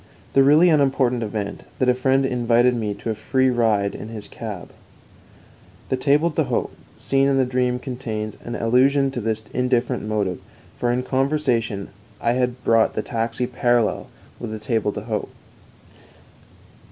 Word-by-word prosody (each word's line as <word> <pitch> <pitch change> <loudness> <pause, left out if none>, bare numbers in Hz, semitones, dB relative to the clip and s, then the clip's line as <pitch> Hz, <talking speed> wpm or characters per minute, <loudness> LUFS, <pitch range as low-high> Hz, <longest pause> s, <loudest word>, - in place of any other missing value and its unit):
The 135 - +5
really 150 +6 +6
unimportant 135 -5 +2
event, 105 -2 -4 0.2
that 130 - +1
a 125 - +5
friend 130 +2 +2
invited 120 -1 +2
me 105 -3 -2
to 115 - -4
a - - 0
free 130 +4 +1
ride 110 -4 +1
in - - -7
his 110 -2 -7
cab. 105 -6 -7 1.2
The - - +2
table 145 +5 +2
d'hôte - - -1 0.3
scene 135 0 +1
in 135 -1 +2
the 130 - +3
dream 125 0 0
contains 115 -5 -5
an 120 - -5
allusion 135 +4 +3
to 125 - -4
this 110 0 -2
indifferent 125 -1 0
motive, 105 -4 -1 0.4
for 120 - 0
in 125 +1 0
conversation 130 -7 0 0.3
I 115 - +1
had 125 0 -1
brought 115 -1 +3
the - - -1
taxi 115 +1 -2
parallel 120 -2 +1 0.3
with 120 - -5
the 110 - -5
table 110 -2 -1
d'hôte. 105 +1 -4
125 Hz, 155 wpm, -22 LUFS, 110-130 Hz, 1.2 s, really